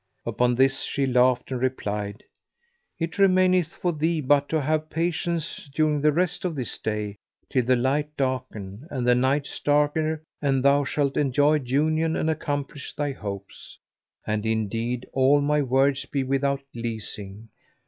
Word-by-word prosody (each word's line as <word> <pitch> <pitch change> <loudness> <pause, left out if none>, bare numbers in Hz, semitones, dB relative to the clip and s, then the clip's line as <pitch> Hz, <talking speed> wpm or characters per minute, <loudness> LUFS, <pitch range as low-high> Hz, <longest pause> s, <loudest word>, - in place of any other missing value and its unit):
Upon 125 0 +1
this 135 +1 +3
she 140 - -1
laughed 125 0 +2
and 125 -2 -2
replied, 105 -5 -2 0.7
"It 165 +4 -4
remaineth 185 -3 +4
for 175 -1 -1
thee 160 +2 0
but 145 0 +2
to 160 - +1
have 155 +2 -1
patience 165 -2 -2
during 155 -2 +2
the 150 +1 +4
rest 175 +3 0
of 175 -3 -2
this 130 -5 -3
day 105 -1 -3 0.3
till 130 - +2
the 130 +1 +4
light 145 +4 0
darken 130 -3 -3
and 130 -6 -3
the 125 - +6
night 130 +4 +2
starker 150 +2 0 0.2
and 135 -3 +1
thou 140 +1 +5
shalt 140 -1 0
enjoy 145 +2 +3
union 155 +5 +1
and 160 - +1
accomplish 145 -2 -4
thy 145 -1 -1
hopes; 100 -6 -8 0.5
and 105 0 -1
indeed 115 +2 -1
all 135 +2 +4
my 150 +1 +2
words 135 +1 +2
be 140 -2 -1
without 135 +1 0
leasing." 110 -2 -6
140 Hz, 150 wpm, -25 LUFS, 125-150 Hz, 0.7 s, the